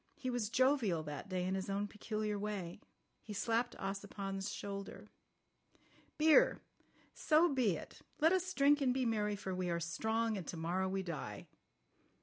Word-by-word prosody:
He 255 -2 -3
was 240 -4 -1
jovial 240 - +2
that 150 +5 -6
day 180 -1 -1
in 185 - 0
his 190 0 -2
own 200 +1 -1
peculiar 210 0 -3
way. 200 -3 -4 0.4
He 215 - -8
slapped 230 +4 0
Ossipon's 195 0 -4
shoulder. 200 -1 -6 1.1
"Beer! 315 +11 +5 0.5
So 315 0 +3
be 235 -9 +2
it! - - -11 0.2
Let 320 +4 +5
us 370 0 0
drink 285 +1 +5
and 255 -2 +2
be 260 -1 +1
merry, 210 -2 +1
for 190 -2 -4
we 180 -1 -2
are 170 0 0
strong, 220 +6 0
and 175 - -8
to 175 - -5
morrow 180 +3 0
we 190 0 -1
die." 140 - -5
205 Hz, 160 wpm, -36 LUFS, 190-245 Hz, 1.1 s, Beer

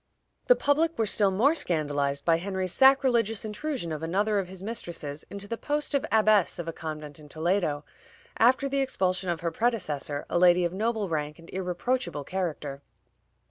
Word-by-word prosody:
The - - +7
public 315 +1 +1
were 225 - +2
still 205 -1 +3
more 225 +11 +3
scandalized 145 - -1
by 165 -1 +4
Henry's 185 0 -3
sacrilegious 245 -5 +4
intrusion 215 - -4
of 155 -1 -4
another 200 +6 +1
of 190 - -3
his 190 0 -9
mistresses 170 -9 -5
into 200 0 -6
the 230 +2 -4
post 295 0 -2
of 280 +2 +1
abbess 215 -4 +4
of 170 -1 -5
a 165 - -3
convent 155 -2 -7
in 150 -1 -14
Toledo, 160 -2 -1 0.5
after 255 +4 +4
the 275 0 -1
expulsion 185 -8 0
of 170 -2 -2
her 170 -1 -1
predecessor, 155 - -1
a 175 - 0
lady 180 0 +5
of 170 - -2
noble 220 +1 -1
rank 150 -2 -3
and 165 0 -14
irreproachable 185 - -2
character. 150 -6 -4
185 Hz, 175 wpm, -27 LUFS, 160-230 Hz, 0.5 s, The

